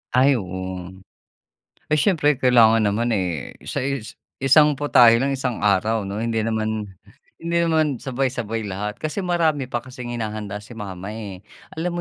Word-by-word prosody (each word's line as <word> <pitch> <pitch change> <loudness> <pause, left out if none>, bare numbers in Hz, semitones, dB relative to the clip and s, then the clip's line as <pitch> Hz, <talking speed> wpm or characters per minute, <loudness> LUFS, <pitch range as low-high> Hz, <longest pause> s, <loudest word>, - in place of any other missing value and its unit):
Ay, 130 -1 +4
oo. 95 -1 -6 1.0
Ay, 155 - +1
siyempre 155 -7 +3
kailangan 115 -3 +5
naman, 110 +3 +1
eh, 90 - -2 0.2
sa - - -3
is 135 -4 -4 0.2
isang 150 +3 +5
putahe 120 -5 +6
lang 140 +1 +1
isang 130 -3 -3
araw, 105 +2 +2
'no? 100 +1 -5
Hindi 115 0 -1
naman, 110 -1 -2 0.5
hindi 170 +1 -2
naman 155 -6 +1
sabay-sabay 120 -4 -2
lahat, 100 +2 -4
kasi 155 +6 -3
marami 160 -7 0
pa 120 - -1
kasing 125 -2 -7
hinahanda 105 -2 -4
si 105 +3 -12
mama, 100 -2 -7
eh. 100 -4 -8 0.3
Alam 175 +2 -1
115 Hz, 150 wpm, -22 LUFS, 105-135 Hz, 1.0 s, putahe